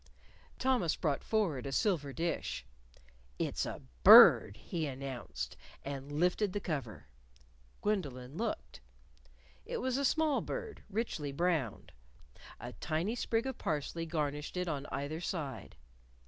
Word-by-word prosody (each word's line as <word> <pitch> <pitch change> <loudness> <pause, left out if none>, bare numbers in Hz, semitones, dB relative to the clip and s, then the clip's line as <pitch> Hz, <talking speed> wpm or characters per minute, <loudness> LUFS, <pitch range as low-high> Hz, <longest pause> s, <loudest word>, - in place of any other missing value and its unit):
Thomas 250 -11 +2
brought 145 -4 -1
forward 175 - 0
a - - -4
silver 145 -3 +1
dish. 165 +4 -2 0.7
"It's - - -1
a - - -6 0.2
bird!" 100 - +10
he 165 -4 -3
announced, 125 - -5 0.3
and 140 0 -5
lifted 180 +6 +1
the 205 - -1
cover. 135 - -4 0.8
Gwendolyn 140 -11 -2
looked. - - -4 0.8
It - - -4
was 260 0 0
a 280 - 0
small 310 +1 +2
bird, 475 -3 -5
richly 195 -9 -2
browned. 155 - -1 0.7
A - - -7
tiny 165 +8 -1
sprig 230 -1 0
of 265 - -4
parsley 165 +2 -2
garnished 150 0 -2
it 180 0 -1
on 145 -3 -3
either 145 +4 -4
side. 155 -7 -4
160 Hz, 125 wpm, -33 LUFS, 140-205 Hz, 0.8 s, bird